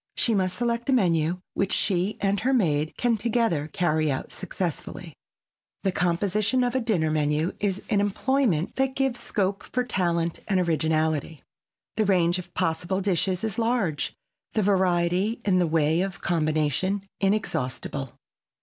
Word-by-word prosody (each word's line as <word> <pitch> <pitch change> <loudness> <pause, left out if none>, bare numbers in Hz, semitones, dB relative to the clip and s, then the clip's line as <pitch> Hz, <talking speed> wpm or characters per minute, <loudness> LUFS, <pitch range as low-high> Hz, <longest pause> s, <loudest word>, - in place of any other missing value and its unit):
She 230 - +2
must 185 -2 0
select 235 +1 -1
a - - +4
menu 175 -6 +2
which 195 - 0
she 190 +1 +1
and 200 0 +1
her 260 +4 +2
maid 155 -8 +1
can 240 -2 +2
together 220 -9 0
carry 155 -3 +1
out 130 - -4
successfully. 175 -2 -5 0.7
The 195 - +2
composition 200 +8 +1
of 245 -1 0
a 260 - +2
dinner 180 -10 +1
menu 150 +2 +1
is 200 -1 -1
an 205 -3 +2
employment 205 - 0
that 265 0 +1
gives 265 -3 0
scope 195 -2 -1
for 250 - -2
talent 170 -7 0
and 195 -3 +2
originality. 160 -2 0 0.5
The 215 - +3
range 180 -2 +3
of 180 - -9
possible 175 +4 0
dishes 185 -1 0
is 220 0 -1
large, 225 -10 0 0.4
the 215 - +1
variety 185 +2 +2
in 185 -3 +3
the 175 - +2
way 160 +1 +2
of 190 -3 -3
combination 160 +4 0 0.2
inexhaustible. 135 - -1
185 Hz, 150 wpm, -26 LUFS, 165-215 Hz, 0.7 s, a